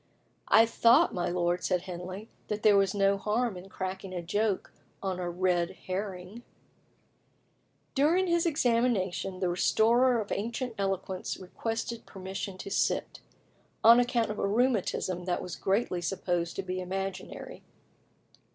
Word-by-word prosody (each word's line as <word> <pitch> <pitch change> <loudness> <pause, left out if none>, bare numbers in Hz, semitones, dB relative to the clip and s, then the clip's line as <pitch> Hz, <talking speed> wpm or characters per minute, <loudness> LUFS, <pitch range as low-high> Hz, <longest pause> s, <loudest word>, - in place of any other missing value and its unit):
"I 225 +1 +7
thought, 230 +1 +4
my 175 - -1
lord," 175 0 0
said 180 -1 0
Henley, 185 +3 -7 0.2
"that 210 +1 -3
there 210 -2 +6
was 195 0 +3
no 200 0 +3
harm 220 +1 0
in 180 +2 -10
cracking 190 0 -5
a 175 - -2
joke 205 +3 -1 0.3
on 190 -2 -2
a 175 -1 -2
red 175 -1 +1 0.2
herring." 190 +2 -5 1.5
During 320 +7 +3
his 340 -1 +2
examination, 230 - 0
the 180 - +1
restorer 235 +7 +3
of 210 - -5
ancient 235 +4 -2
eloquence 195 -1 -2
requested 225 +5 -4
permission 190 0 -6
to 195 - -7
sit, - - 0 0.6
on 230 +2 +9
account 240 -3 +1
of 210 - -5
a - - +1
rheumatism 200 -5 0
that 180 -1 0
was 180 - -6
generally 190 -2 0
supposed 175 -1 -2
to 195 - -3
be 185 0 -3
imaginary. 190 +1 -5
195 Hz, 140 wpm, -29 LUFS, 185-225 Hz, 1.5 s, on